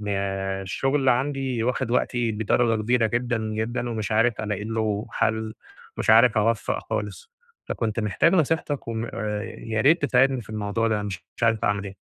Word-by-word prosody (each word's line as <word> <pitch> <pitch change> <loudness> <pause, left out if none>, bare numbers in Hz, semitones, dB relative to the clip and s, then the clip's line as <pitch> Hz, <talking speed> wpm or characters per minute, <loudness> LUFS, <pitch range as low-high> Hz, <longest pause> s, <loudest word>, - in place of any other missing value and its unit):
أنا 95 -1 -2
الشغل 135 +8 0
عندي 130 -2 0
واخد 120 -1 -1
وقتي 120 -2 0
بدرجة 110 +1 +1
كبيرة 120 0 +2
جدًا، 120 +2 -1
جدًا، 110 +2 -3
ومش 110 -2 -3
عارف 115 +1 +2
ألاقي 105 -1 -3
له 110 -2 -1
حل، 110 0 -1 0.4
مش - - +1
عارف 115 0 +6
أوفق 110 0 +1
خالص، 470 -1 -4 0.3
فكنت 115 -1 -2
محتاج 105 - +2
نصيحتك 160 -5 0
وم 115 0 -2 0.4
ياريت 115 +8 +1
تساعدني 130 0 +3
في 110 - -12
الموضوع 110 +1 -1
ده، 105 -2 0
مش 95 -4 -6
مش - - -13
عارف 115 -1 +2
أعمل 100 0 0
إيه؟ 100 -1 -8
115 Hz, 160 wpm, -24 LUFS, 105-125 Hz, 0.4 s, عارف